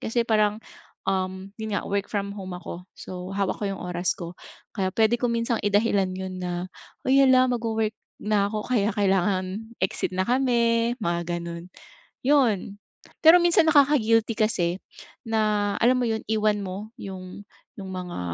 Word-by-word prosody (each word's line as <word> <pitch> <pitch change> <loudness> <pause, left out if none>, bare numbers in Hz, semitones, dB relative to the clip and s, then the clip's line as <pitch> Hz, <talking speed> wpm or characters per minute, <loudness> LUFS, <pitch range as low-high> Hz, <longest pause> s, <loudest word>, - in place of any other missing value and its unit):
kasi 235 +2 0
parang 215 -1 +2 1.0
'yon 220 0 -4
nga 200 - 0
work 200 0 0
from 200 -1 -1
home 185 -2 -6
ako. 180 0 -8
So, 185 +1 -7
hawak 195 -1 -1
ko 210 - -2
yung 195 - -5
oras 180 0 -1
ko. 170 +1 -8 0.4
Kaya 190 -1 0
puwede 225 +1 +3
ko 245 - +2
minsan 230 0 0
idahilan 205 -2 +2
'yon 185 0 -5
na, 175 0 -3 0.4
"Hoy, 265 +1 +4
hala, 255 -1 +5
magwo-work 225 -2 -1 0.3
na 210 -1 +2
ako 215 -1 -3
kaya 215 -3 +2
kailangan 195 +2 0
exit 190 0 -1
na 185 - +1
kami," 235 -2 +2
mga 170 -1 -1
gano'n. 170 0 -7 0.6
'Yon 225 -9 +2 0.4
pero 330 +3 +7
minsan 340 -1 +4
nakaka-guilty 230 -7 +3
kasi 185 -6 +1 0.5
na, 215 -2 +1
alam 250 +2 +4
mo 250 - +1
'yon, 220 0 -1
iwan 215 -1 +1
mo 200 +3 -6
yung 185 0 -8 0.4
yung 190 -1 -7
mga 180 - -5
210 Hz, 155 wpm, -25 LUFS, 185-230 Hz, 1.0 s, pero